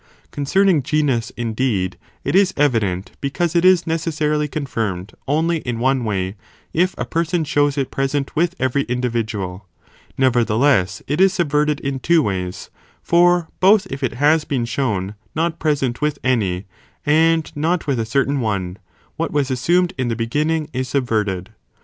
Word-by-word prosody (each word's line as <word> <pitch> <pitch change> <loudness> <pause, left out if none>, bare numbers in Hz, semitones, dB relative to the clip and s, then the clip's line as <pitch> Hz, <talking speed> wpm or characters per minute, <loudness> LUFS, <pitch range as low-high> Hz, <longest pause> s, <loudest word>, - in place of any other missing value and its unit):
Concern 190 +8 +1
ing 170 -7 +4
genus 135 -5 0
indeed, 115 -5 -1 0.3
(it - - -1
is 190 -1 +4
evident,) 110 -10 +1
because 170 +5 -1
it 170 - +3
is 185 -2 +5
necessarily 155 -2 0
confirmed 110 -10 -3
only 160 +4 +1
in 125 -5 -4
one 130 +1 +1
way, 95 -3 -2 0.4
if 180 +3 +1
a - - -2
person 165 +1 0
shows 145 -1 +1
it 135 -2 -1
present 135 +1 -2
with 175 +3 +1
every 130 +1 +1
individual; 110 -6 -3 0.5
nevertheless, 120 -4 +2
it 150 +6 0
is 190 -1 +5
subverted 150 -3 +1
in 135 -1 -3
two 165 +3 +3
ways, 90 -4 -4 0.3
for 175 0 +4
both 200 +2 +5
if 135 - -5
it 130 -3 -1
has 150 +4 +3
been 130 -6 -1
shown 105 -6 -2 0.2
not 165 +1 -1
present 140 -6 0
with 150 -1 0
any, 105 -7 0 0.4
and 160 +1 +3
not 160 +3 0
with 140 -5 0
a - - +1
certain 140 +3 +1
one, 100 -6 -2 0.4
what 165 0 -1
was 145 -2 0
assumed 175 +8 +2
in 130 - 0
the 115 - -1
beginning 150 +7 -1
is 130 0 -2
subverted. 110 -7 -1
140 Hz, 155 wpm, -20 LUFS, 115-160 Hz, 0.5 s, is